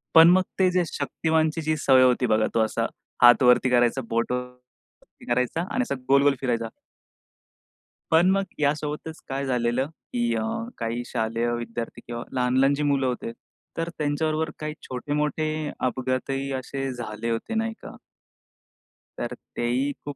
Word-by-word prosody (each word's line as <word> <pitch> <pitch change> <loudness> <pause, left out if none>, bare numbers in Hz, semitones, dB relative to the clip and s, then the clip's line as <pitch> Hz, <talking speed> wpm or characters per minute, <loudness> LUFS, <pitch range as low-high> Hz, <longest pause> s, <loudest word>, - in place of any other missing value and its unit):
पण 165 +1 +10
मग 185 +1 +5 0.2
ते 185 - +5
जे 180 0 +2
शक्तिमानचीजी 160 -1 0
सवय 130 -2 +5
होती 125 0 +3
बघा 110 0 +3
तो 115 - +2
असा 110 - -1 0.4
हात 120 +1 +8
वरती 125 +1 +5
करायचा, 120 +1 +3
बोट 115 +2 0
वरती 125 0 -9
करायचा 125 +7 0
आणि 255 - +1
असा 140 - -1
गोल-गोल 140 0 +5
फिरायचा 115 -3 -1 1.4
पण 165 +3 +5
मग 195 0 +2 0.2
यासोबतच 150 +2 -1
काय 135 +1 -2
झालेलं 125 +1 0 0.3
की 240 -1 +1
अ, - - 0 0.4
काही 115 +1 -2
शालेय 115 +1 -1
विद्यार्थी 120 0 -5
किंवा 120 0 -5
लहान-लहान 130 +2 +3
जी 150 - -2
मुलं 140 -2 +2
होते 125 -2 -3 0.5
तर 165 +1 -1
त्यांच्याबरोबर 155 +1 0
काही 155 0 -4
छोटे-मोठे 150 +4 -2 0.3
अपघातही 130 +2 -1
असे 135 +1 -4
झाले 115 -1 -5
होते, 115 - -3
नाही 225 0 0
का? - - -9 1.2
तर 120 +1 -3 0.2
तेही 125 +4 0
खूप 145 - -5
135 Hz, 145 wpm, -25 LUFS, 120-155 Hz, 1.4 s, पण